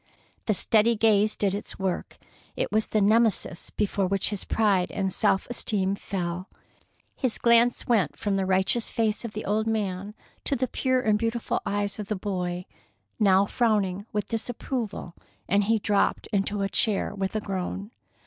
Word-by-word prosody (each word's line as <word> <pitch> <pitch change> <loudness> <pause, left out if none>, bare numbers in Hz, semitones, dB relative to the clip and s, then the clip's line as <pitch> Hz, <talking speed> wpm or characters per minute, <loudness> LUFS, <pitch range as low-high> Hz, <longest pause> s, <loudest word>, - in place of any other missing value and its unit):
The 215 - +3
steady 225 +4 +4
gaze 215 -1 +3
did 200 -2 0
its 205 - -4
work. 190 -2 -3 0.4
It - - -1
was 215 +1 +1
the 215 - +1
Nemesis 215 -4 +2
before 200 -2 0
which 195 +2 +1
his 205 - -3
pride 200 -5 +2
and 190 -2 -1
self 190 - +2
esteem 200 -5 -1
fell. 180 -2 -4 0.7
His 255 -5 -1
glance 235 +1 +4
went 215 -9 +1
from 205 -2 -1
the 190 -1 0
righteous 190 +5 +2
face 220 -1 0
of 230 -2 -6
the 215 - -5
old 215 +2 0
man 205 -2 -2 0.3
to 280 - +1
the 255 0 0
pure 255 +1 0
and 215 -3 +2
beautiful 230 +1 -1
eyes 205 0 -2
of 210 - -5
the 215 - -1
boy, 180 -2 -3 0.5
now 195 -2 +5
frowning 205 -3 0
with 210 -1 -1
disapproval, 225 -4 -4 0.3
and 200 +1 +2
he 225 +2 +3
dropped 205 -1 +1
into 200 0 0
a - - +1
chair 200 +1 0
with 195 0 -3
a - - +2
groan. 195 +1 -4
205 Hz, 170 wpm, -26 LUFS, 195-220 Hz, 0.7 s, now